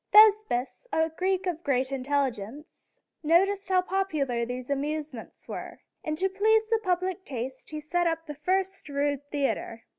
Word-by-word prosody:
Thes´pis, 425 - +5
a 320 0 +2
Greek 375 +3 0
of 350 -2 -2
great 260 -1 +1
intelligence, 270 -1 -3 0.2
noticed 385 +5 +3
how 370 -1 +4
popular 300 -12 0
these 250 +2 -5
amusements 290 -3 -4
were, - - -7 0.2
and 310 0 -2
to 380 +3 +2
please 435 +3 +3
the 455 - +4
public 370 -1 -1
taste 260 -2 -5
he 305 - -4
set 340 +3 0
up 330 0 -1
the 300 - -6
first 375 +4 -1
rude 285 0 0
theater. 270 -5 -2
310 Hz, 150 wpm, -28 LUFS, 275-380 Hz, 0.2 s, Thes´pis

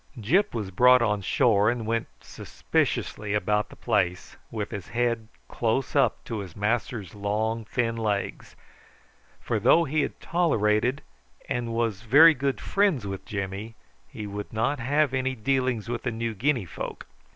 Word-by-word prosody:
Gyp 180 - +2
was 105 -4 -3
brought 125 +5 +6
on 105 -3 0
shore, 105 -1 +3
and 120 -2 -2
went 115 +1 -1
suspiciously 105 0 -2
about 105 +1 0
the - - -13
place 90 -3 -1
with 105 -2 -4
his 100 -3 -6
head 120 -2 -1 0.2
close 120 +4 -1
up 140 - +2
to 115 -3 -4
his 95 -5 -8
master's 105 -2 -2
long 110 +2 -2
thin 115 0 -1
legs, 105 -3 -3 0.8
for - - -2
though 170 - +5
he 155 0 0
had - - -4
tolerated 125 -7 +1 0.4
and 120 -1 -2
was 115 -3 -1
very 145 +9 +7
good 140 -1 -2
friends 195 - +1
with 95 -1 -6
Jimmy, 100 +3 -5 0.3
he 105 - -8
would 100 0 -6
not 120 +6 0
have 140 +3 +1
any 130 0 0
dealings 125 -1 0
with 120 0 -3
the 125 - -2
New 115 0 -3
Guinea 120 0 0
folk. 85 - -7
115 Hz, 155 wpm, -26 LUFS, 105-130 Hz, 0.8 s, very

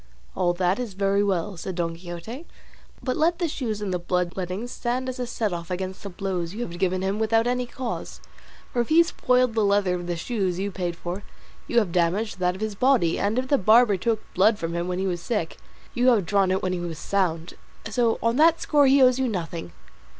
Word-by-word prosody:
"All 175 -2 +1
that 180 +4 +1
is 230 -6 -5
very 200 +1 +2
well," 195 -1 -1
said 185 +2 -5
Don 165 -1 -2
Quixote; 175 - -8 0.6
"but 255 - -1
let 335 +2 +2
the 345 - 0
shoes 230 -8 -3
and 190 -2 -2
the 180 - 0
blood 180 0 -1
lettings 190 +6 -4
stand 250 +2 -2
as 255 0 -4
a 245 - -2
setoff 185 -8 -3
against 185 +1 -4
the 200 - -6
blows 185 -1 -3
you 230 - -4
have 175 -6 -7
given 185 0 0
him 195 +2 -1
without 225 +1 +2
any 250 0 0
cause; 250 -1 -5 0.5
for 240 - +2
if 235 - -4
he 330 +2 +6
spoiled 250 -7 +1
the 220 -1 +1
leather 200 -2 +2
of 175 -1 -4
the 175 - -1
shoes 185 0 -2
you 200 +2 -2
paid 175 -2 -3
for, 175 +3 -5 0.5
you 240 - -1
have 210 -7 +3
damaged 185 +4 0
that 180 0 +1
of 190 - -10
his 215 -1 -2
body, 225 -7 +2
and 205 +4 0
if 255 0 0
the 280 - +3
barber 215 +2 +5
took 220 +3 -1
blood 210 +4 +4
from 165 -2 -4
him 170 +1 -2
when 180 0 -2
he 190 - -1
was 175 -2 -2
sick, 205 -7 -2 0.4
you 245 +1 +1
have 225 -7 +4
drawn 195 0 +2
it 190 +1 0
when 185 0 0
he 180 - -2
was 170 -2 -5
sound; 175 -3 -1 0.3
so 230 0 +1
on 230 +1 +2
that 330 +2 +5
score 290 -2 +3
he 270 0 +6
owes 255 0 +5
you 260 - +1
nothing." 170 - -4
200 Hz, 230 wpm, -25 LUFS, 180-240 Hz, 0.6 s, he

